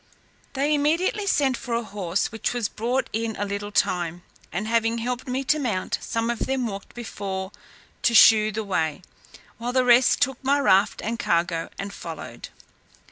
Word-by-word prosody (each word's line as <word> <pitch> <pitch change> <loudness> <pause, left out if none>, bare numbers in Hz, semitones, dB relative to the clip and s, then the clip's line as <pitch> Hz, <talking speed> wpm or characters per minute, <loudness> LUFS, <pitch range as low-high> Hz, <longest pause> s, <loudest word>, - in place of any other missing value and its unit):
They 285 +2 +1
immediately 335 +8 +1
sent 275 -7 +2
for 240 -1 -4
a 235 - -1
horse, 195 -3 -2
which 225 +2 -2
was 235 -4 0
brought 245 +6 -1
in 225 0 -2
a 205 - -2
little 200 +1 -4
time; 175 -3 0 0.3
and 195 +5 -3
having 230 0 +1
helped 245 +2 -3
me 260 +2 -1
to 300 +3 +2
mount, 215 -9 -1
some 230 +1 -1
of 235 - -4
them 265 -1 0
walked 200 -3 -7
before 195 -4 -5 0.5
to 235 - +2
shew 215 -1 +7
the 220 +1 -3
way, 165 -4 -1 0.6
while 240 +1 -3
the 255 -1 +3
rest 245 +1 +5
took 270 -3 0
my 280 +2 +3
raft 200 -7 +3
and 230 +1 -3
cargo 170 -3 0
and 200 0 -5
followed. 165 -5 -8
230 Hz, 175 wpm, -24 LUFS, 200-255 Hz, 0.6 s, shew